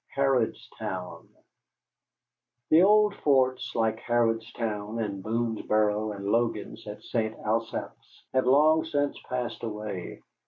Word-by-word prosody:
HARRODSTOWN 120 Hz, -8 st, -2 dB, 1.4 s
The 160 Hz, +2 st, +7 dB
old 210 Hz, +1 st, +5 dB
forts 130 Hz, -3 st, +2 dB
like 110 Hz, -1 st, +1 dB
Harrodstown 115 Hz, -2 st, -1 dB
and 100 Hz, -3 st, -3 dB
Boonesboro 110 Hz, -2 st, 0 dB
and 100 Hz, 0 st, -7 dB
Logan's 115 Hz, +3 st, -1 dB
at -, -, -8 dB
St. 110 Hz, -2 st, -2 dB
Asaph's 115 Hz, +1 st, -3 dB
have 130 Hz, -1 st, +2 dB
long 155 Hz, +4 st, +5 dB
since 145 Hz, -3 st, -1 dB
passed 125 Hz, -1 st, -3 dB
away. 105 Hz, -5 st, -5 dB
115 Hz, 105 wpm, -27 LUFS, 110-130 Hz, 1.4 s, The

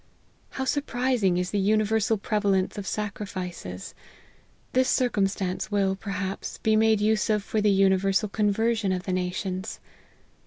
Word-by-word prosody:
How 265 Hz, -, -1 dB
surprising 250 Hz, -9 st, +1 dB
is 180 Hz, 0 st, -1 dB
the 205 Hz, -, 0 dB
uni 215 Hz, +2 st, +3 dB
versal 220 Hz, 0 st, +1 dB
prevalence 200 Hz, -3 st, 0 dB
of 200 Hz, -2 st, -6 dB
sacrifices!. 185 Hz, -, -5 dB, 0.8 s
This 255 Hz, 0 st, +3 dB
circumstance 195 Hz, -6 st, 0 dB
will, 195 Hz, -2 st, +1 dB
perhaps, 195 Hz, -1 st, -4 dB
be 220 Hz, -1 st, +2 dB
made 220 Hz, -1 st, +4 dB
use 215 Hz, +1 st, +1 dB
of 210 Hz, -2 st, +2 dB
for 215 Hz, +2 st, -1 dB
the 210 Hz, -, +3 dB
universal 195 Hz, +1 st, +3 dB
conversion 215 Hz, 0 st, +1 dB
of 180 Hz, -1 st, -1 dB
the 185 Hz, -, -2 dB
nations. 185 Hz, +2 st, -3 dB
205 Hz, 140 wpm, -26 LUFS, 190-220 Hz, 0.8 s, made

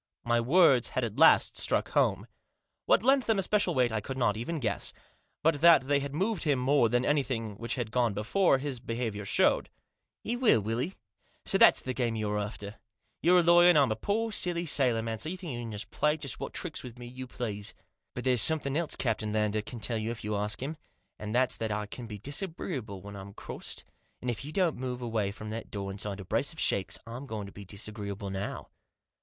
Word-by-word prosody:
My 120 Hz, 0 st, +2 dB
words 135 Hz, -2 st, +5 dB
had 130 Hz, -, -2 dB
at 115 Hz, -3 st, -4 dB
last -, -, +6 dB
struck -, -, +1 dB
home. -, -, +1 dB, 0.6 s
What -, -, +4 dB
lent 270 Hz, +1 st, +3 dB
them 225 Hz, -2 st, +3 dB
especial 195 Hz, -2 st, +1 dB
weight 125 Hz, -2 st, +3 dB
I 110 Hz, -1 st, -1 dB
could 130 Hz, +5 st, -6 dB
not 115 Hz, -5 st, +2 dB
even 120 Hz, +10 st, -3 dB
guess. 105 Hz, -6 st, -2 dB, 0.5 s
But 155 Hz, -2 st, +2 dB
that 170 Hz, -4 st, +8 dB
they 140 Hz, +1 st, +2 dB
had 140 Hz, 0 st, -5 dB
moved 195 Hz, +4 st, 0 dB
him 145 Hz, -4 st, +2 dB
more 130 Hz, -1 st, +3 dB
than 120 Hz, +2 st, +1 dB
anything 130 Hz, -7 st, 0 dB
which 115 Hz, +1 st, -2 dB
had 120 Hz, -4 st, -3 dB
gone 120 Hz, -4 st, +1 dB
before 135 Hz, -, +2 dB
his 135 Hz, -2 st, -4 dB
behaviour 115 Hz, -3 st, -4 dB
showed. -, -, +3 dB, 0.3 s
" -, -, -58 dB
He 235 Hz, -, -1 dB
will, 240 Hz, -, +5 dB
will 110 Hz, +3 st, -2 dB
he? 175 Hz, +9 st, -2 dB, 0.5 s
So -, -, +1 dB
that's -, -, +7 dB
the 130 Hz, -, -3 dB
game 120 Hz, -3 st, -1 dB
you're 105 Hz, -1 st, -1 dB
after. 105 Hz, 0 st, -6 dB, 0.4 s
You're 180 Hz, +3 st, +5 dB
a 175 Hz, -, +5 dB
lawyer, 175 Hz, +1 st, +7 dB
and 175 Hz, -, +6 dB
I'm 135 Hz, -5 st, +4 dB
a -, -, +1 dB
poor, 225 Hz, -, -1 dB
silly 175 Hz, -4 st, 0 dB
sailor 125 Hz, -7 st, +2 dB
man, 115 Hz, -1 st, -3 dB
so 135 Hz, -, -3 dB
you 185 Hz, -, -4 dB
think 175 Hz, -7 st, -6 dB
you 120 Hz, -1 st, -5 dB
can 100 Hz, -, -4 dB
play 150 Hz, +1 st, +1 dB
just 140 Hz, -4 st, -5 dB
what -, -, -5 dB
tricks -, -, -5 dB
with 125 Hz, -1 st, -10 dB
me 120 Hz, -, -9 dB
you 130 Hz, +1 st, -8 dB
please. 105 Hz, -5 st, -5 dB, 0.4 s
But 125 Hz, -, -4 dB
there's 125 Hz, -3 st, +4 dB
something 145 Hz, -4 st, +3 dB
else 165 Hz, 0 st, 0 dB
Captain 110 Hz, -3 st, -1 dB
Lander 105 Hz, 0 st, +1 dB
can 115 Hz, +3 st, -8 dB
tell 115 Hz, +1 st, -1 dB
you 110 Hz, +1 st, -3 dB
if 115 Hz, -, -5 dB
you 105 Hz, 0 st, -2 dB
ask 105 Hz, +4 st, -1 dB
him, 155 Hz, +4 st, -4 dB, 0.4 s
and 105 Hz, +1 st, -4 dB
that's 125 Hz, 0 st, +2 dB
that 110 Hz, -1 st, -2 dB
I 105 Hz, 0 st, -2 dB
can 115 Hz, +3 st, -8 dB
be 105 Hz, -2 st, -7 dB
disagreeable 135 Hz, -, -5 dB
when 100 Hz, 0 st, -9 dB
I'm 100 Hz, 0 st, -9 dB
crossed, -, -, -8 dB, 0.4 s
and 125 Hz, -, -2 dB
if 115 Hz, +2 st, -6 dB
you 150 Hz, -, -6 dB
don't 175 Hz, -1 st, +1 dB
move 125 Hz, -1 st, -4 dB
away 110 Hz, -4 st, -1 dB
from 105 Hz, +1 st, -8 dB
that 115 Hz, +1 st, -6 dB
door 100 Hz, -1 st, -4 dB
inside 100 Hz, 0 st, -4 dB
a 95 Hz, -, -8 dB
brace 115 Hz, -, -1 dB
of 160 Hz, -, -11 dB
shakes 95 Hz, -4 st, +1 dB
I'm 120 Hz, +4 st, -7 dB
going 110 Hz, -4 st, -4 dB
to 100 Hz, -, -10 dB
be 100 Hz, 0 st, -10 dB
disagreeable 100 Hz, 0 st, -6 dB
now." 95 Hz, +1 st, -5 dB
120 Hz, 225 wpm, -29 LUFS, 105-145 Hz, 0.6 s, that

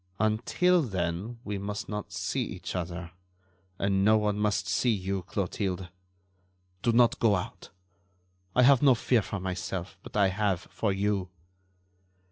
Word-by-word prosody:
"Until 140 Hz, +12 st, +3 dB
then 95 Hz, -, -3 dB
we 105 Hz, -1 st, -3 dB
must 100 Hz, +1 st, -4 dB
not 105 Hz, -1 st, -5 dB
see -, -, -2 dB
each -, -, -6 dB
other 85 Hz, -1 st, -4 dB, 0.7 s
and 95 Hz, -1 st, +1 dB
no 110 Hz, +2 st, +6 dB
one 105 Hz, -1 st, 0 dB
must 100 Hz, -4 st, 0 dB
see 90 Hz, +8 st, +1 dB
you, 95 Hz, -3 st, -1 dB
Clotilde. 95 Hz, 0 st, -3 dB, 0.9 s
Do 120 Hz, -, +2 dB
not 120 Hz, 0 st, +4 dB
go 110 Hz, -3 st, +4 dB
out. 90 Hz, -, -5 dB, 0.9 s
I 125 Hz, -, +6 dB
have 135 Hz, 0 st, +6 dB
no 135 Hz, -3 st, +6 dB
fear 120 Hz, 0 st, +2 dB
for 100 Hz, 0 st, -5 dB
myself, 90 Hz, 0 st, -4 dB
but -, -, -7 dB
I 100 Hz, -2 st, +5 dB
have 95 Hz, -2 st, 0 dB
for 110 Hz, -, 0 dB
you." 100 Hz, -1 st, 0 dB
100 Hz, 145 wpm, -28 LUFS, 95-110 Hz, 0.9 s, no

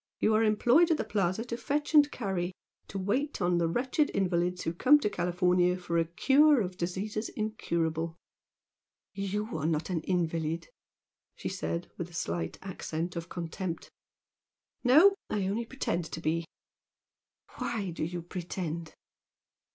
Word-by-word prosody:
You 220 Hz, -, +3 dB
are 215 Hz, -, +4 dB
employed 240 Hz, +10 st, +4 dB
at 325 Hz, -, +3 dB
the -, -, -1 dB
Plaza 195 Hz, +2 st, 0 dB
to 235 Hz, -, -3 dB
fetch 295 Hz, +5 st, -2 dB
and 295 Hz, -1 st, +7 dB
carry; 190 Hz, -8 st, -2 dB, 0.4 s
to 195 Hz, -, -6 dB
wait 245 Hz, +10 st, -1 dB
on 175 Hz, 0 st, +2 dB
the 170 Hz, -, +2 dB
wretched 255 Hz, -, +1 dB
invalids 180 Hz, -1 st, +1 dB
who 165 Hz, -, -1 dB
come 285 Hz, +12 st, +6 dB
to 210 Hz, -7 st, -1 dB
California 180 Hz, 0 st, +2 dB
for 170 Hz, -2 st, -1 dB
a 165 Hz, -, +2 dB
'cure' 275 Hz, -, +5 dB
of 185 Hz, -2 st, -3 dB
diseases 195 Hz, +5 st, -3 dB
incurable 165 Hz, -7 st, -2 dB, 0.5 s
" -, -, -63 dB
"YOU 210 Hz, +3 st, -2 dB
are 155 Hz, -1 st, -1 dB
not 160 Hz, +3 st, -1 dB
an 165 Hz, -3 st, 0 dB
invalid!" 165 Hz, -2 st, -1 dB, 0.7 s
she -, -, -4 dB
said 180 Hz, -2 st, -3 dB
with 175 Hz, 0 st, -3 dB
a -, -, -17 dB
slight 85 Hz, -, -2 dB
accent 175 Hz, -2 st, -4 dB
of 170 Hz, 0 st, -5 dB
contempt. 175 Hz, 0 st, -5 dB, 0.9 s
"No! 310 Hz, +11 st, +7 dB, 0.2 s
I 200 Hz, -2 st, 0 dB
only 220 Hz, +5 st, -1 dB
pretend 180 Hz, -10 st, -2 dB
to -, -, -3 dB
be!" 165 Hz, +1 st, 0 dB, 1.1 s
"Why 210 Hz, -6 st, -2 dB
do 165 Hz, -, -4 dB
you 175 Hz, +1 st, -3 dB
pretend?" 170 Hz, -2 st, -5 dB
180 Hz, 150 wpm, -30 LUFS, 170-220 Hz, 1.1 s, and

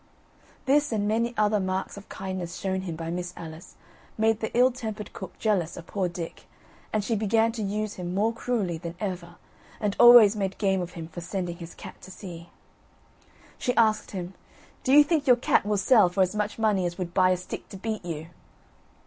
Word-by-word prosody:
This, 290 Hz, +1 st, +3 dB
and 205 Hz, -2 st, 0 dB
many 230 Hz, +2 st, +1 dB
other 210 Hz, 0 st, +3 dB
marks 190 Hz, 0 st, -2 dB
of 200 Hz, 0 st, -12 dB
kindness 185 Hz, -2 st, -5 dB
shown 190 Hz, -1 st, -2 dB
him 175 Hz, -3 st, -5 dB
by 165 Hz, 0 st, -5 dB
Miss 180 Hz, 0 st, -4 dB
Alice, 160 Hz, 0 st, -10 dB, 0.4 s
made 220 Hz, 0 st, +2 dB
the 220 Hz, -, -2 dB
ill 255 Hz, +1 st, +6 dB
tempered 220 Hz, -4 st, -6 dB
cook 190 Hz, -, -8 dB
jealous 190 Hz, -7 st, 0 dB
of 170 Hz, -, -8 dB
poor 190 Hz, -1 st, -2 dB
Dick, 170 Hz, -1 st, -7 dB, 0.5 s
and 215 Hz, -1 st, 0 dB
she 225 Hz, +3 st, 0 dB
began 220 Hz, +2 st, +2 dB
to 225 Hz, -1 st, -5 dB
use 210 Hz, +1 st, -2 dB
him 180 Hz, 0 st, -4 dB
more 220 Hz, +4 st, +2 dB
cruelly 220 Hz, -9 st, -2 dB
than 170 Hz, 0 st, -6 dB
ever, 180 Hz, -4 st, -5 dB, 0.4 s
and 205 Hz, -2 st, -1 dB
always 240 Hz, -3 st, +9 dB
made 195 Hz, -2 st, -2 dB
game 195 Hz, -2 st, +1 dB
of 175 Hz, -, -6 dB
him 165 Hz, -2 st, -7 dB
for 170 Hz, +1 st, -8 dB
sending 180 Hz, -1 st, -4 dB
his 170 Hz, -1 st, -10 dB
cat -, -, -11 dB
to -, -, -12 dB
sea. 175 Hz, -3 st, -9 dB, 1.1 s
She 250 Hz, -, 0 dB
asked 215 Hz, -2 st, +3 dB
him: 185 Hz, -1 st, -6 dB, 0.5 s
"Do 260 Hz, -, +1 dB
you 295 Hz, +2 st, +9 dB
think 295 Hz, -1 st, 0 dB
your 250 Hz, -, +8 dB
cat 235 Hz, -3 st, +2 dB
will 210 Hz, -1 st, +1 dB
sell 200 Hz, -1 st, +5 dB
for 190 Hz, +2 st, +2 dB
as 185 Hz, -, -1 dB
much 210 Hz, 0 st, -2 dB
money 210 Hz, -5 st, +2 dB
as 175 Hz, -, -6 dB
would 175 Hz, -2 st, -4 dB
buy 185 Hz, -1 st, +4 dB
a 185 Hz, -, +2 dB
stick 180 Hz, -, -8 dB
to 195 Hz, -, -8 dB
beat 215 Hz, +1 st, -4 dB
you?" 165 Hz, -2 st, -6 dB
195 Hz, 205 wpm, -26 LUFS, 180-220 Hz, 1.1 s, always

